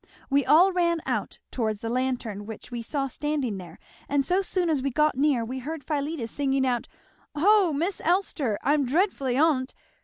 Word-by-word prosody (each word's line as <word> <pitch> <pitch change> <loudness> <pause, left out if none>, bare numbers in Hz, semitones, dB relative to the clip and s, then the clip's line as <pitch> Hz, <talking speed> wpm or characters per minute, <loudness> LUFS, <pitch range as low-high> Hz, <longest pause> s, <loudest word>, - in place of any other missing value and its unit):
We 280 0 +4
all 325 +9 +6
ran 340 -2 +1
out, - - -2
towards 220 -4 -2
the 230 - -4
lantern 240 -5 -2
which 220 +2 -9
we 240 -1 -4
saw 275 +4 -2
standing 270 -6 -2
there, 175 -3 -11 0.3
and 280 -1 +1
so 365 +5 +2
soon 370 -2 -1
as 305 -5 +1
we 275 - 0
got 300 +3 +2
near 270 -4 +2
we 260 +3 -5
heard 300 +3 -6
Philetus 285 -4 -3
singing 270 -2 0
out, 245 -2 -1 0.5
'Ho, 385 +3 +4
Miss 340 +7 -2
Elster! 315 - 0
I'm 290 0 +3
dreadfully 275 -3 0
on't!' 280 -4 +2
280 Hz, 180 wpm, -26 LUFS, 250-320 Hz, 0.5 s, all